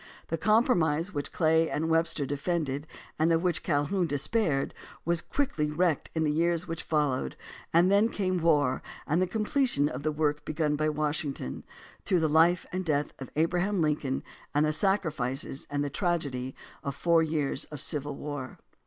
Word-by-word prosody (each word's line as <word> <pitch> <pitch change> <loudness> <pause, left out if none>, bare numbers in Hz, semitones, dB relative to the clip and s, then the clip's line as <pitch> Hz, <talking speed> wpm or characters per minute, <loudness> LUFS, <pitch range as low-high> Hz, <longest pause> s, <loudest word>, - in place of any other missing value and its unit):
The 165 - -1
compromise 185 - +2
which 145 -2 -3
Clay 160 -1 +3
and 160 +2 -1
Webster 165 -3 +2
defended 145 0 -2 0.3
and 160 +2 +3
of 165 +1 +2
which 175 -3 +1
Calhoun 170 +4 +1
despaired 145 - 0 0.3
was 170 0 +2
quickly 265 - -1
wrecked 160 0 +1
in 160 - +1
the 150 - +2
years 170 +2 +1
which 165 -1 -3
followed, 145 - 0 0.4
and 175 +3 +4
then 205 +3 +4
came 185 -5 -1
war 150 -5 +3 0.2
and 165 +5 +1
the 185 - +2
completion 220 - +1
of 130 -2 -5
the 155 +1 0
work 150 -1 0
begun 155 -1 0
by 155 +1 +1
Washington, 150 - -2 0.4
through 180 -3 +2
the 160 - +3
Hfe 165 +3 +4
and 185 +1 -2
death 150 -3 0
of 135 - -6
Abraham 180 +5 +1
Lincoln 150 -4 0 0.3
and 150 +1 +4
the 155 - +1
sacri 190 0 +1
fices 135 0 -3
and 145 0 -1
the 140 - -4
tragedy 140 -7 -1 0.3
of 140 -1 -3
four 170 +1 +3
years 155 -3 -1
of 150 - -9
civil 145 -1 -1
war. 145 -3 -6
155 Hz, 170 wpm, -29 LUFS, 145-175 Hz, 0.4 s, and